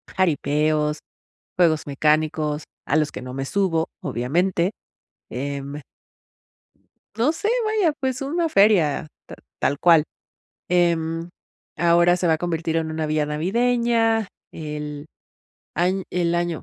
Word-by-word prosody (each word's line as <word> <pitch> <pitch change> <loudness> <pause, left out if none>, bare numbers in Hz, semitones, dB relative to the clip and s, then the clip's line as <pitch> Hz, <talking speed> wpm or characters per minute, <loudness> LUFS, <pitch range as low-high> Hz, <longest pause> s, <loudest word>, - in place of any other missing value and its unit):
jaripeos, 150 -3 +1 0.6
juegos 160 -4 +3
mecánicos, 150 +1 +1 0.2
a 145 - +1
los 150 -1 +1
que - - -6
no 125 0 -8
me 135 0 -3
subo, 165 0 0
obviamente, 170 +8 0 0.6
em 140 +3 -5 1.4
no 260 +8 +2
sé, 410 +7 -2 0.2
vaya, 430 -7 +2
pues 260 -1 -2
una 330 +5 0
feria 195 - +3 0.2
ta - - -10 0.2
tal 145 - +1
cual, 165 -3 +6 0.7
em, 170 -1 +1 0.5
ahora 170 +1 +4
se 180 0 0
va 165 - +4
a 160 - +1
convertir 165 -1 -1
en 160 -1 -1
una 160 0 -2
villa 155 0 +1
navideña. 225 +6 +1 0.2
El 150 -1 -6 0.7
añ 185 +4 +1
el 175 -1 0
año 175 -2 -1
165 Hz, 125 wpm, -23 LUFS, 150-190 Hz, 1.4 s, cual